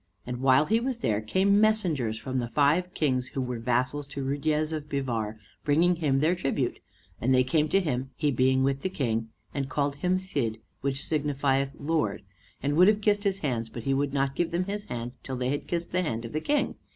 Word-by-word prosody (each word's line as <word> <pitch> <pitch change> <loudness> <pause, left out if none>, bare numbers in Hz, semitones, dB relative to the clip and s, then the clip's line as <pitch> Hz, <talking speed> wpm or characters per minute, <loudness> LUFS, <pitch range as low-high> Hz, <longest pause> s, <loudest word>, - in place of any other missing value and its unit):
And 125 0 -4
while 130 +3 +4
he 220 +7 +2
was 255 0 -2
there 110 - 0
came 195 - +3
messengers 170 - +2
from 130 +3 -3
the 120 - -2
five 150 +8 +2
kings 130 -4 +1
who 135 - -5
were 125 -2 -3
vassals 125 +5 0
to 140 -1 -5
Ruydiez 150 +3 0
of 150 -2 -4
Bivar, 115 -6 -2 0.3
bringing 165 +4 +3
him 145 -5 +1
their 155 +5 +3
tribute; 135 -7 -1 0.4
and 130 +2 +3
they 130 - +5
came 150 +4 +2
to 195 - +3
him, 135 -7 -2
he 150 -2 +1
being 130 +1 +3
with 135 0 0
the 190 - -1
King, 115 -9 -1 0.2
and 135 -1 -2
called 140 -1 -1
him 180 +5 +1
Cid, 140 - -2 0.2
which 135 0 -1
signifieth 140 -2 0
lord, 145 -10 -1 0.4
and 145 +1 +1
would 180 +2 +7
have 210 0 +4
kissed 205 0 +2
his 195 -1 +2
hands, 115 -4 -1
but 120 - -7
he 135 - +1
would 140 +1 0
not 135 -1 0
give 175 - 0
them 175 +2 0
his 205 +2 -4
hand 120 0 -5
till 130 - -5
they 125 0 -1
had 145 +1 -2
kissed 170 -1 -2
the 180 - +1
hand 115 -9 -2
of 115 - -7
the 155 - -1
King. 290 - 0
140 Hz, 220 wpm, -27 LUFS, 130-170 Hz, 0.4 s, would